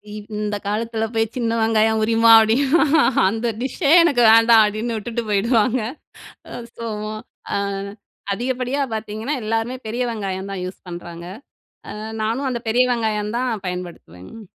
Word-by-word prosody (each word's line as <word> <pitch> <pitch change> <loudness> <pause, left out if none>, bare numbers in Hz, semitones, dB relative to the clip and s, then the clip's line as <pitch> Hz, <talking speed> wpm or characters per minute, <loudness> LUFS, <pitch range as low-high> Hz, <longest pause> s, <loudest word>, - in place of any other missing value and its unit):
இவ் 210 -1 -9
இந்த 210 0 -2
காலத்தில 225 +1 -2
போய் 225 0 -1
சின்ன 230 -1 -1
வெங்காயம் 220 0 +2
உரிமா 230 +1 +4
அப்பிடின்னா, 265 +9 +3 0.5
அந்த 225 +3 -2
டிஷ்ஷே 275 +4 -1
எனக்கு 280 -8 +2
வேண்டாம் 230 0 +6
அப்பிடின்னு 215 +3 -3
விட்டுட்டு 230 +2 -4
போயிடுவாங்க. 230 +4 +2 0.8
அது 235 -1 -9
ஸோ, 230 - -6 0.2
மா 215 - -5 0.4
அ - - +1 0.8
அதிகப்படியா 255 +4 -2
பார்த்தீங்கன்னா, 220 +5 -4
எல்லாருமே 225 +3 -2
பெரிய 235 +3 -3
வெங்காயம் 195 -3 -4
தான் 190 -2 -5
யூஸ் 185 - -8
பண்றாங்க. 170 -1 -8 0.7
அ - - -8 0.3
நானும் 235 +5 -1
அந்த 240 -2 -3
பெரிய 245 +3 +3
வெங்காயம் 215 -2 -2
தான் 255 0 -1 0.2
பயன்படுத்துவேங்க. 180 - -8
225 Hz, 140 wpm, -21 LUFS, 210-240 Hz, 0.8 s, வேண்டாம்